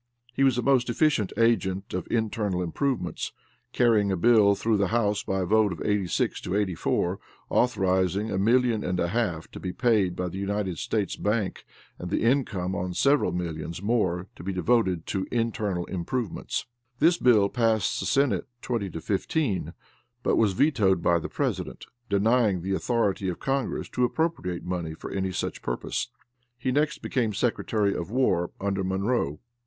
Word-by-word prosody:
He 135 - +1
was 130 -3 +4
a 125 - 0
most 130 -3 +3
efficient 120 - +2
agent 100 -4 +1
of 90 -1 -3
internal 105 -5 0
improvements, 90 - -2 0.4
carrying 110 -5 +3
a 95 - 0
bill 105 0 +5
through 110 +1 +1
the 100 -1 +2
House 105 -2 +1
by 95 0 -2
a - - 0
vote 110 +1 +3
of 85 - -6
86 105 -4 0
to 90 - -3
84, 95 -1 0 0.3
authorizing 95 -3 +1
a 95 - 0
million 115 +1 +3
and 90 0 -1
a 85 - +1
half 90 -6 -1
to - - -8
be 90 - -4
paid 105 -6 +2
by 90 0 -2
the 95 +2 -5
United 100 -3 -2
States 105 -3 -1
bank 105 -2 -1 0.3
and 90 - -5
the 100 - 0
income 115 -8 +1
on 90 -1 -3
seven 140 -11 +3
millions 85 0 -5
more 100 -5 +1
to - - -11
be 95 - -2
devoted 95 -2 +1
to 95 -1 -2
internal 110 -6 -1
improvements. 95 +5 -3 0.3
This 170 +5 +4
bill 110 -5 +5
passed 110 -2 +1
the - - -2
Senate 135 -9 +2 0.2
twenty 115 -6 -2
to 80 -1 -7
fifteen, 105 - -1 0.5
but - - +2
was 105 -4 +3
vetoed 95 - +2
by 85 0 +3
the - - -6
president, - - -3 0.2
denying 100 -2 +2
the 95 +1 -1
authority 100 -3 0
of 90 - -4
congress 135 -1 -1
to 125 - -1
appropriate 125 - -1
money 85 -3 -3
for - - -8
any 95 -1 -1
such - - -3
purpose. - - -2 0.5
He 130 +1 -1
next 150 +3 0
became 115 -5 0
Secretary 105 -2 0
of 85 +1 -4
War, 100 -8 +1
under 100 -1 -1
Monroe. 95 - -1
100 Hz, 170 wpm, -26 LUFS, 90-120 Hz, 0.5 s, bill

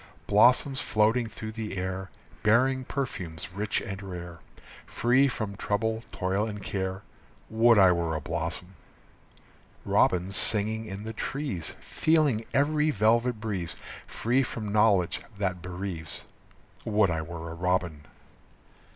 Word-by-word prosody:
Blossoms 125 +6 +4
floating 110 +3 +2
through 110 0 -7
the 110 -3 -5
air, 95 +1 -3 0.3
Bearing 130 +5 +3
perfumes 90 - -4
rich 105 +2 -1
and 95 0 -6
rare, 90 -3 -7 0.5
Free 125 +4 +3
from 110 -6 -4
trouble, 110 +3 -1
toil, 95 +4 -1
and 105 -2 -6
care. 95 0 -3 0.5
Would 115 +1 +5
I 95 -2 +7
were 85 -2 0
a - - -1
blossom! 85 +4 -4 1.1
Robins 90 +2 +2
singing 110 +2 +1
in 100 0 -6
the 110 +1 -5
trees, 115 - -3
Feeling 150 -8 +1
every 150 +2 +2
velvet 115 0 +2
breeze, 95 -6 -3 0.3
Free 125 +4 +1
from 110 -5 -4
knowledge 105 -5 +3 0.2
that 95 -3 -2
bereaves. 90 -4 -5 0.6
Would 105 -4 +2
I 80 -1 -1
were 85 0 -7
a - - -5
robin! 85 -3 -1
105 Hz, 125 wpm, -28 LUFS, 90-115 Hz, 1.1 s, I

